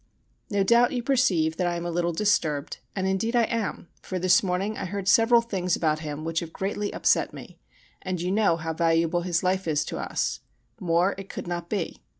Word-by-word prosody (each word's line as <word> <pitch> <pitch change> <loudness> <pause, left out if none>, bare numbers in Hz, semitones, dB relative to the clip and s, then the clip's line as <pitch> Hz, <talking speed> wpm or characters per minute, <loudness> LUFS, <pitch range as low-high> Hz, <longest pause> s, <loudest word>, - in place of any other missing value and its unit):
No 200 -2 +1
doubt 235 +5 +4
you 245 -2 -2
perceive 185 - +2
that 180 - 0
I 175 - -1
am 170 0 -4
a 175 - -2
little 175 0 0
disturbed, 160 -6 0 0.2
and 190 - -1
indeed 190 +5 0
I 240 - +5
am; 225 -5 -2
for 185 - -4
this 185 +1 +4
morning 195 +3 -1
I - - -4
heard 195 +1 -4
several 230 +3 +5
things 185 -6 -1
about 155 -2 0
him 155 0 -6
which 165 0 0
have 165 -1 -7
greatly 205 +2 -3
upset - - +1
me, - - -11 0.4
and 185 -2 -3
you 180 +2 -1
know 200 -5 +3
how 160 0 -3
valuable 165 +1 +2
his 175 -1 -1
life 185 0 0
is 150 -2 +1
to - - -5
us - - -2 0.4
more 175 0 +2
it 195 - -9
could - - -6
not 175 -1 -4
be. 195 -6 -3
180 Hz, 210 wpm, -26 LUFS, 170-205 Hz, 0.4 s, I